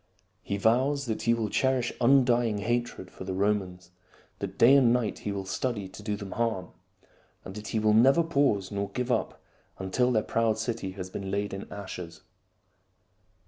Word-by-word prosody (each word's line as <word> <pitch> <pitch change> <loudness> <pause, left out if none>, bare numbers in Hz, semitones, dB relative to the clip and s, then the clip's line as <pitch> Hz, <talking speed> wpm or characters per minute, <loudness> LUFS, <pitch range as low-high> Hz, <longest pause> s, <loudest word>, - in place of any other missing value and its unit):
He 100 - -3
vows 130 +7 +2
that 110 -3 -3
he 115 0 +2
will 115 -2 -1
cherish 130 -2 +1
undying 120 -3 +4
hatred 120 -3 -2
for - - -9
the 95 0 -4
Romans, 95 -3 -1 0.5
that - - -5
day 130 +4 +7
and 130 -4 +5
night 120 -3 0
he 105 - -4
will 100 -1 -4
study 105 -1 -2
to 95 - -11
do 105 0 -2
them 100 -2 -8
harm, 115 -6 -1 0.8
and 95 - -7
that 105 +1 -8
he - - -2
will 110 0 +3
never 135 +9 +5
pause 140 - +1
nor 100 0 -2
give 125 +4 -3
up - - -2 0.3
until 110 +7 0
their 110 -3 +2
proud 115 -1 +1
city 110 -4 -3
has 95 -1 -7
been 95 0 -5
laid 100 +1 -2
in 95 - -7
ashes. 90 -4 -8
110 Hz, 180 wpm, -28 LUFS, 100-120 Hz, 0.8 s, day